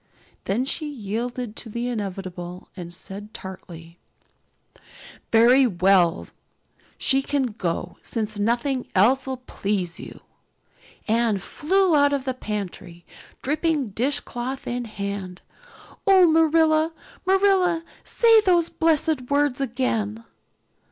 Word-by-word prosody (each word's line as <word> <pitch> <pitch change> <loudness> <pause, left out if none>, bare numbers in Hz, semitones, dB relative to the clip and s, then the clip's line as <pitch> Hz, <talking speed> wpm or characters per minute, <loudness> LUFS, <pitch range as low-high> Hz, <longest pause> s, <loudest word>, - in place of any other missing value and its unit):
Then 230 +7 0
she 305 +3 -2
yielded 240 -1 -4
to 230 - -5
the 235 +3 -3
inevitable 185 -5 -5
and 175 -3 -8
said 195 +4 -10
tartly: 170 -3 -10 1.3
"Very 245 +4 +6
well, 185 -3 +3 0.7
she 270 -1 +2
can 270 -3 -1
go, 175 -4 -3
since 215 -2 -4
nothing 245 +4 0
else 250 +9 +4
'll 265 - -2
please 195 -7 -3
you." - - -10 0.9
Anne 225 -1 +2
flew 355 - +1
out 285 -1 +4
of 275 -2 -1
the 260 - -1
pantry, 195 -7 -6 0.4
dripping 300 -2 0
dishcloth 260 +2 -2
in 245 0 -3
hand. 200 -3 -6 0.6
"Oh, 380 -2 +7
Marilla, 320 0 +3 0.3
Marilla, 380 -3 +3 0.2
say 455 -2 +5
those 350 -4 +3
blessed 315 -5 +1
words 285 -2 +1
again." 230 -4 -1
245 Hz, 110 wpm, -24 LUFS, 200-290 Hz, 1.3 s, Oh